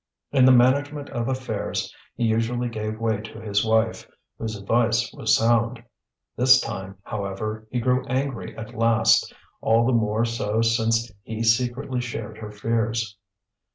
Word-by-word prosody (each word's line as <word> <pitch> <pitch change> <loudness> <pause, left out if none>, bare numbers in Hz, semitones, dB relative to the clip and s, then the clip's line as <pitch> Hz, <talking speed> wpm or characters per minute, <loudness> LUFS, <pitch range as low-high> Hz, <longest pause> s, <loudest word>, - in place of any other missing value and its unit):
In 135 -3 +5
the 130 - +7
management 140 +4 +3
of 115 -1 -2
affairs 130 -1 -3 0.2
he - - -2
usually 115 +2 0
gave 110 -1 -4
way 110 -2 0
to 110 0 -10
his 105 -2 0
wife, 110 0 +1 0.3
whose 110 -1 -3
advice 115 +3 +1
was 110 - +2
sound. 115 +1 +1 0.5
This 130 +1 +6
time, 95 -5 -6
however, 105 +2 -4
he 125 - -1
grew 125 +2 +1
angry 130 -6 -3
at 110 -1 -8
last, 115 0 +3 0.3
all 115 +1 +3
the 130 - +2
more 110 0 +1
so 115 -1 -1
since 115 0 +1
he 110 +2 -5
secretly 125 +2 +1
shared 115 -3 -6
her 105 - -7
fears. 110 0 -1
115 Hz, 150 wpm, -24 LUFS, 110-120 Hz, 0.5 s, the